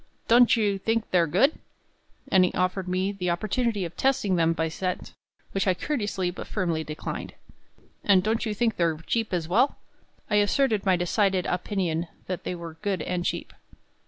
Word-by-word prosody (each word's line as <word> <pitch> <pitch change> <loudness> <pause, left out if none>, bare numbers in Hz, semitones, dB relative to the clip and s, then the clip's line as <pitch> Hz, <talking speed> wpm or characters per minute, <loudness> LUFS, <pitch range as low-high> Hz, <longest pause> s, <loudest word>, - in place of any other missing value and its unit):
"Don't 240 0 +6
you 205 -3 +1
think 225 +2 -1
they're 175 -2 +4
good?" 195 - +3 0.7
and 190 -2 +6
he 180 - +2
offered 185 +1 -1
me 185 +2 0
the 185 -3 -3
opportunity 210 +3 0
of 170 0 -8
testing 260 -8 +1
them 165 -1 +3
by 165 -1 0
scent, 180 +3 -4 0.4
which 195 0 -1
I 185 - +3
courteously 205 -6 -2
but 180 - -8
firmly 170 -6 -1
declined, 155 0 -6 0.7
"and 190 -3 +5
don't 220 +2 0
you 215 -2 -2
think 225 0 0
they're 165 -2 +1
cheap 225 -2 -1
as 170 -3 -1
well?" 235 - +2 0.5
I 210 - +2
asserted 210 0 +2
my 185 - +5
decided 185 +1 +1
opinion 180 -3 -1 0.2
that 185 -1 -5
they 180 - -2
were 165 -2 -8
good 195 -6 -1
and 180 +1 -2
cheap. - - -3
190 Hz, 175 wpm, -26 LUFS, 175-215 Hz, 0.7 s, Don't